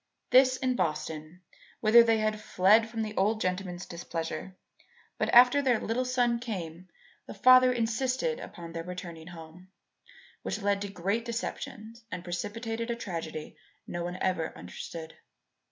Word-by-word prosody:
This 255 0 +6
in 255 -1 0
Boston 155 0 -3 0.4
whither 225 +2 +7
they 225 -1 +3
had 215 0 -1
fled 215 +4 +4
from 225 0 -3
the 215 0 -5
old 215 +3 +2
gentleman's 185 -2 -3
displeasure; 170 +1 -5 0.6
but - - +1
after 250 +4 +7
their 250 -5 +2
little 240 +3 -1
son 245 -2 +1
came 185 -7 -6 0.4
the - - -8
father 255 0 +7
insisted 255 - 0
upon 170 - -9
their 165 - -4
returning 175 -2 -8
home, 170 +1 -12 0.7
which - - -3
led 200 0 +1
to 200 - -3
great 200 +5 -1
deceptions, 230 -1 -6
and 180 -1 -5
precipitated 225 +6 -4
a 235 - 0
tragedy 165 -8 -6 0.3
no 175 0 -4
one 175 +1 -4
ever 180 -4 -1
understood. 160 - -8
205 Hz, 145 wpm, -29 LUFS, 175-235 Hz, 0.7 s, whither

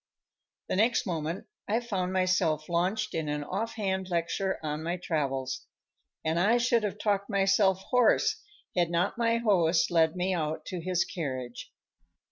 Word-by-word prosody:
The - - -1
next 230 +4 +3
moment 165 -1 -3 0.2
I 220 +3 +2
found 195 -7 -2
myself 185 -5 +1
launched 185 +6 0
in 160 -2 -2
an 150 0 -2
offhand 190 0 -2
lecture 180 +3 -1
on 150 0 -2
my 170 +3 -2
travels. 135 -6 -2 0.6
And 160 +2 +1
I 215 +7 +4
should 235 -1 +2
have 210 -1 -3
talked 205 -1 0
myself 195 -1 +3
hoarse 250 - +3 0.3
had 175 -2 +2
not 175 +6 0
my 230 0 +3
host 175 -8 +3
led 160 -1 +3
me 185 +1 0
out 155 -2 -2
to 180 -2 -5
his 180 0 +1
carriage. 130 -7 -5
185 Hz, 150 wpm, -29 LUFS, 160-205 Hz, 0.6 s, I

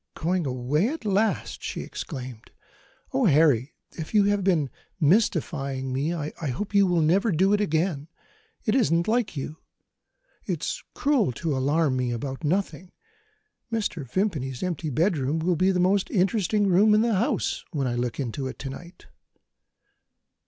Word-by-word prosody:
"Going 175 -1 -1
away, 130 - 0
at 295 -3 -5
last!" 210 +2 0
she - - -4
exclaimed. 125 -5 -7 0.6
"Oh, 265 -1 +2
Harry, 145 -5 +3 0.2
if 160 +6 -7
you 205 - +6
have 205 -1 +1
been 165 -8 +1 0.3
mystifying 145 - +1
me, 140 +5 0
I 155 -3 -3 0.2
hope 195 +12 -4
you 200 -1 +5
will 175 -3 +2
never 195 +8 +3
do 190 +4 +3
it 210 - +2
again. 160 -5 0 0.6
It 215 - +2
isn't 170 -10 +2
like 225 -7 0
you; 145 +3 -5 0.9
it's - - -3
cruel 275 - +2
to 155 +3 -2
alarm 140 +1 +1
me 125 -1 0
about 130 +5 -4
nothing. 180 +1 -1 0.8
Mr. 210 -9 -2
Vimpany's 145 - -1
empty 170 -3 -2
bedroom 155 -1 +1
will 170 +2 +1
be 185 +4 +2
the 185 -2 +1
most 190 +2 +2
interesting 205 +2 +1
room 200 +3 +5
in 215 - +4
the 230 0 +2
house, 210 +4 0
when 145 -6 -1
I 125 - -1
look 120 +1 -2
into 130 +1 -3
it 130 - -7
to 135 - -5
night." 175 +6 -11
170 Hz, 155 wpm, -25 LUFS, 140-200 Hz, 0.9 s, you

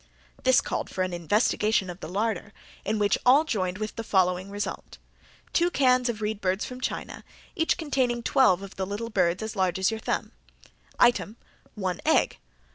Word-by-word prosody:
This 260 0 +5
called - - -3
for 185 - -1
an 185 -1 -3
investigation 205 +3 +1
of 180 0 -7
the - - -7
larder 205 +1 -2 0.3
in 215 +2 -1
which 205 -1 +2
all 270 +5 +6
joined 185 - -2
with 215 +1 -5
the 230 - -3
following 185 -2 +1
result: 205 +1 -5 0.5
Item - - -30
two 345 +1 +3
cans 255 -5 +3
of 220 -2 -4
reed 210 0 -2
birds 190 +2 0
from 250 0 -8
China, - - -4 0.3
each 325 -3 +1
containing 260 -7 0
twelve 200 -9 +3
of 195 - -10
the 190 -1 -2
little 220 +4 -4
birds 180 0 +1
as 220 0 -5
large 185 -2 +1
as 190 +3 +2
your 220 - -4
thumb. - - -2 0.7
Item 240 -2 +3 0.4
one 185 -4 -3
egg. - - +2
210 Hz, 185 wpm, -26 LUFS, 190-240 Hz, 0.7 s, all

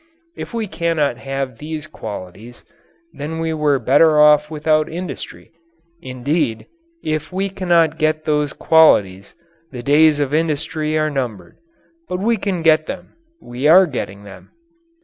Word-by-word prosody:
If - - -8
we 230 -2 -3
cannot 165 -8 -1
have 135 -2 -5
these 155 0 -6
qualities, 105 - -10 0.5
then 155 +3 -6
we 165 0 -2
were 150 -2 +1
better 145 +5 +4
off 150 0 +5
without 155 0 0
industry. 180 +2 -7 0.5
Indeed, 130 -2 -2 0.4
if 155 +1 -3
we 195 +2 -2
cannot 170 -4 +1
get 155 0 0
those 150 -1 0
qualities, 100 -12 +3 0.4
the 125 -2 -8
days 150 +2 +4
of 145 -1 -1
industry 155 0 -1
are 155 0 0
numbered. 125 -8 -5 0.5
But 180 - -2
we 225 +4 0
can 190 -4 -3
get 155 -1 +3
them. - - -8 0.3
We 125 +4 -3
are 185 +4 +7
getting 100 - -6
them. 100 -1 -13
150 Hz, 140 wpm, -19 LUFS, 135-160 Hz, 0.5 s, are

